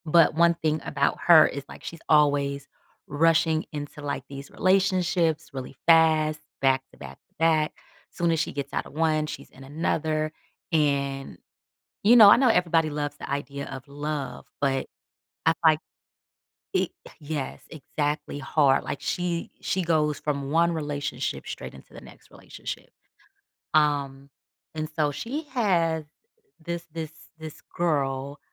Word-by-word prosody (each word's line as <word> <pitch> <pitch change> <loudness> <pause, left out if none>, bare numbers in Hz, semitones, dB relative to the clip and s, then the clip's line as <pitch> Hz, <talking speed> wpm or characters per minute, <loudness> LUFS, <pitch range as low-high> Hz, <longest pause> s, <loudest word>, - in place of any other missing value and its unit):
But 165 0 +5
1 170 +1 +4
thing 155 -2 -1
about 140 - 0
her 160 -3 +9
is, 140 - -5
like, - - -12
she's 165 - -7
always 145 -2 +3 0.4
rushing 160 +1 +2
into, 145 0 -7
like, 140 -2 -3
these 140 0 -8
relationships 185 -4 +1
really 130 0 -7
fast, 155 -2 +5 0.2
back-to-back-to-back, 135 - 0 0.4
soon 170 -1 0
as 165 - +1
she 160 - -1
gets 140 -1 -5
out - - -1
of - - -13
1, 155 0 +1
she's - - -8
in 135 - -14
another. 155 +1 -1 0.4
And, 140 -3 0 0.7
you 225 +4 +7
know, 215 -4 +10
I 220 - +8
know 260 0 +4
everybody 165 -6 +3
loves 145 0 -3
the - - -8
idea 140 0 -4
of 135 +1 -8
love, 145 -1 -5
but 135 -1 0 0.6
I'm, 160 - +5
like 155 -1 +5 0.9
e - - +2 0.3
yes, 145 -3 -4
exactly 145 0 -3
hard, 140 -1 +3
like, - - -4
she 175 -1 -2
she 190 - -1
goes 155 -3 +1
from 140 -2 -2
1 170 +2 +3
relationship 145 -3 -3
straight - - -7
into 65 - -15
the - - -9
next - - -16
relationship. - - -8 0.8
Um, 140 -2 +1 0.5
and 155 0 -2
so 150 -2 +2
she 260 - -4
had 170 - +1 0.6
this 170 0 -4
this 160 -2 -5 0.3
this 160 -1 -9 0.2
girl, 140 -4 -1
155 Hz, 140 wpm, -26 LUFS, 140-165 Hz, 0.9 s, know